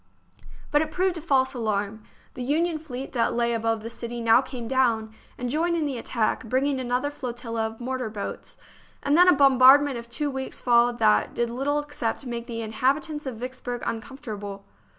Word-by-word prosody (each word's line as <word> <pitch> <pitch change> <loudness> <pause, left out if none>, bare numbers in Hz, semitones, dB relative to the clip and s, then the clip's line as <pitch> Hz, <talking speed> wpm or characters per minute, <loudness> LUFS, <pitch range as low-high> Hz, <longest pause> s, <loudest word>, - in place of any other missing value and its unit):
But 295 - +4
it 315 - -1
proved 360 +2 0
a - - -6
false 265 -4 +2
alarm. 215 -3 -2 0.3
The 255 - -7
Union 315 +5 0
fleet 270 -4 -7
that 235 -2 0
lay 235 0 +1
above 225 -1 -1
the 230 - -5
city 235 +1 -6
now 230 +1 +5
came 250 -3 -7
down, 230 -4 +1 0.2
and 250 - -3
joined 330 +6 +1
in 320 -2 0
the 270 -4 -3
attack, 230 -1 -1
bringing 265 +4 0
another 255 +3 -1
flotilla 235 -4 -3
of 220 0 -10
mortar 255 -1 -3
boats; 210 -2 -7 0.5
and 285 +1 +2
then 355 +2 +7
a 360 - +8
bom 275 -2 +4
bardment 270 0 +7
of 235 0 -11
two 285 +5 -1
weeks 265 0 -4
followed 240 0 +3
that 105 - +3
did 235 -1 0
little 275 +4 0
except 290 -4 -3
make 235 -1 -5
the 230 -1 -4
inhabitants 280 +7 -1
of 250 -4 -5
Vicksburg 245 0 -5
uncom 230 +4 -5
fortable. 205 -6 -7
250 Hz, 190 wpm, -25 LUFS, 230-280 Hz, 0.5 s, a